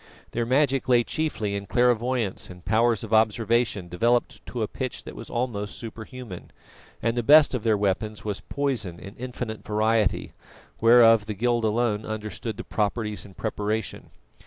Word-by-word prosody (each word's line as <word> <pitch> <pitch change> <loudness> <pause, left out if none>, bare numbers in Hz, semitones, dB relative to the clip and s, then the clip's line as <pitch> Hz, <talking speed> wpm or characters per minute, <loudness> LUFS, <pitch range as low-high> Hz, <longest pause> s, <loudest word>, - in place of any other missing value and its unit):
Their 120 0 -1
magic 135 0 +2
lay 120 -1 +5
chiefly 115 -9 -2
in 100 0 -4
clairvoyance 120 -2 +1
and 90 -1 -12
powers 115 +1 +2
of 110 - -5
observation 110 -2 +2
developed 115 +8 0
to 120 -3 -3
a - - -1
pitch 130 +2 -5
that - - -9
was - - -9
almost 115 -5 -3
superhuman, 115 -3 -8 0.5
and 115 +1 +1
the 120 - +1
best 150 +5 +7
of 125 - -1
their 110 -1 +2
weapons 105 +2 -1
was 105 -2 -3
poison 125 -12 -2
in 100 +3 -10
infinite 120 -3 -6
variety, 110 0 +1 0.5
whereof 115 -2 +6
the 105 - -3
guild 120 +2 +1
alone 110 -1 +1
understood 110 0 -5
the - - -5
properties 105 0 -2
and 95 -2 -15
preparation. 105 -2 -3
110 Hz, 160 wpm, -25 LUFS, 105-120 Hz, 0.5 s, best